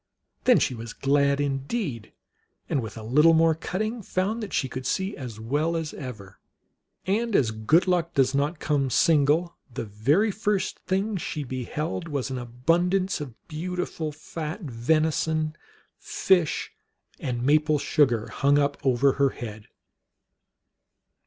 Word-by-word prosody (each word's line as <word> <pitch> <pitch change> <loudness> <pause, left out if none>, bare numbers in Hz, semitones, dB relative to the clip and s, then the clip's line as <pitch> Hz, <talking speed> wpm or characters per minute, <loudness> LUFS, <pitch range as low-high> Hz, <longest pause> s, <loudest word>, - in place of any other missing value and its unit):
Then 250 -2 +6
she 130 - +1
was 115 -1 -7
glad 140 0 +2
indeed, 140 - -2 0.6
and 135 - 0
with 110 -1 -7
a 110 - -7
little 150 +8 +5
more 165 0 +5
cutting 215 +8 -3
found 200 +4 -1
that 210 - -5
she 135 - 0
could 130 0 -5
see 190 +2 -1
as 120 -6 -7
well 150 +9 0
as 160 -2 -4
ever. 110 -8 -9 0.7
And 215 +3 0
as 115 -5 +3
good 110 +12 +2
luck 175 -2 +1
does 135 -1 +3
not 145 +4 0
come 145 -3 0
single, 160 +3 +3
the 115 - -4
very 140 - +2
first 200 -1 -1
thing 195 +2 -1
she 155 -3 -4
beheld 150 +7 -4
was 140 -4 -3
an 130 - -3
abundance 170 +10 0
of 130 -6 -7
beau 170 +3 -4
tiful 160 -3 -3
fat 155 +4 -6
venison, 155 +3 0 0.4
fish, 180 -5 +1 0.5
and 120 -2 -3
maple 150 +2 +3
sugar 125 -6 +2
hung 140 +1 +2
up 145 0 0
over 135 +1 +3 0.2
head. 110 -4 -8
150 Hz, 140 wpm, -26 LUFS, 130-175 Hz, 0.7 s, Then